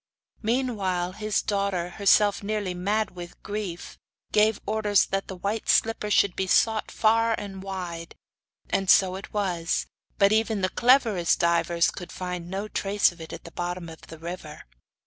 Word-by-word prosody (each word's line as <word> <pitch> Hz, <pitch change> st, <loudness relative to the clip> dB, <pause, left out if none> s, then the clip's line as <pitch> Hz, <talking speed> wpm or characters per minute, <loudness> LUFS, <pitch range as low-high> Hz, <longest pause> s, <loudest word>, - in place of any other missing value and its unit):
Meanwhile, 210 Hz, -7 st, -1 dB
his 215 Hz, +1 st, -1 dB
daughter, 200 Hz, -4 st, -1 dB
herself 200 Hz, +2 st, +3 dB
nearly 205 Hz, -2 st, -2 dB
mad 200 Hz, +3 st, -1 dB
with 175 Hz, -1 st, -10 dB
grief, 205 Hz, -4 st, -5 dB, 0.3 s
gave 215 Hz, 0 st, +3 dB
orders 210 Hz, -1 st, +2 dB
that 195 Hz, 0 st, -3 dB
the 190 Hz, -, -6 dB
white 200 Hz, +4 st, -3 dB
slipper 225 Hz, -2 st, +2 dB
should 200 Hz, -3 st, +3 dB
be 190 Hz, -, -1 dB
sought 220 Hz, +3 st, +2 dB
for -, -, -13 dB
far 225 Hz, +1 st, +3 dB
and 195 Hz, -2 st, -7 dB
wide; 180 Hz, -4 st, -6 dB, 0.6 s
and 195 Hz, -1 st, 0 dB
so 185 Hz, -1 st, +5 dB
it 195 Hz, -, -9 dB
was, 180 Hz, -5 st, -1 dB, 0.3 s
but 200 Hz, 0 st, +4 dB
even 220 Hz, -1 st, +1 dB
the 185 Hz, -, +1 dB
cleverest 230 Hz, -9 st, +3 dB
divers 170 Hz, 0 st, +2 dB
could 175 Hz, -, -9 dB
find 180 Hz, -1 st, -5 dB
no 195 Hz, +3 st, -3 dB
trace 205 Hz, -1 st, +1 dB
of 170 Hz, -1 st, -14 dB
it 160 Hz, -, -9 dB
at -, -, -8 dB
the 170 Hz, -, -11 dB
bottom 175 Hz, 0 st, -4 dB
of 160 Hz, -, -12 dB
the 165 Hz, -, -10 dB
river. 165 Hz, -2 st, -8 dB
195 Hz, 165 wpm, -26 LUFS, 175-210 Hz, 0.6 s, so